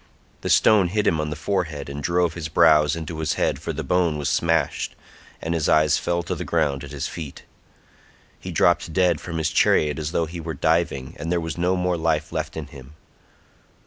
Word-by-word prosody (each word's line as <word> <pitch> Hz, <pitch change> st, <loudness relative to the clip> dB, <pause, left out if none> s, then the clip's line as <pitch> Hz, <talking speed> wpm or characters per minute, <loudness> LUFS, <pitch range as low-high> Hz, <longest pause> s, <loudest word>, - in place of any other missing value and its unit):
The -, -, -3 dB
stone 105 Hz, -4 st, +5 dB
hit 105 Hz, +4 st, -1 dB
him 80 Hz, -3 st, +2 dB
on 75 Hz, -, -3 dB
the 75 Hz, -, -4 dB
forehead 80 Hz, -4 st, -2 dB
and 70 Hz, +1 st, -6 dB
drove 85 Hz, +2 st, +1 dB
his 85 Hz, -2 st, -5 dB
brows 75 Hz, -2 st, +4 dB
into 80 Hz, -1 st, -6 dB
his 80 Hz, -2 st, 0 dB
head -, -, 0 dB
for -, -, -4 dB
the -, -, -4 dB
bone 90 Hz, -4 st, +1 dB
was 75 Hz, -, -1 dB
smashed, 80 Hz, -1 st, 0 dB, 0.4 s
and 80 Hz, -, -3 dB
his 80 Hz, -3 st, 0 dB
eyes 75 Hz, -1 st, +4 dB
fell 85 Hz, 0 st, -1 dB
to -, -, -3 dB
the -, -, -4 dB
ground 75 Hz, -5 st, 0 dB
at -, -, -8 dB
his -, -, -4 dB
feet. 75 Hz, -5 st, -8 dB, 1.0 s
He -, -, -7 dB
dropped 85 Hz, -1 st, +2 dB
dead 90 Hz, -4 st, +2 dB
from 85 Hz, -2 st, -5 dB
his 80 Hz, -2 st, 0 dB
chariot 75 Hz, 0 st, +3 dB
as 75 Hz, 0 st, -3 dB
though 85 Hz, -, +1 dB
he 85 Hz, +2 st, -7 dB
were 80 Hz, 0 st, -5 dB
diving, 80 Hz, -3 st, 0 dB
and 80 Hz, +3 st, -3 dB
there 90 Hz, -, +2 dB
was 80 Hz, -1 st, -4 dB
no 90 Hz, +2 st, +1 dB
more 90 Hz, -1 st, 0 dB
life 80 Hz, -1 st, 0 dB
left 80 Hz, -1 st, -3 dB
in 80 Hz, -, -4 dB
him. 70 Hz, 0 st, -13 dB
80 Hz, 210 wpm, -23 LUFS, 75-85 Hz, 1.0 s, stone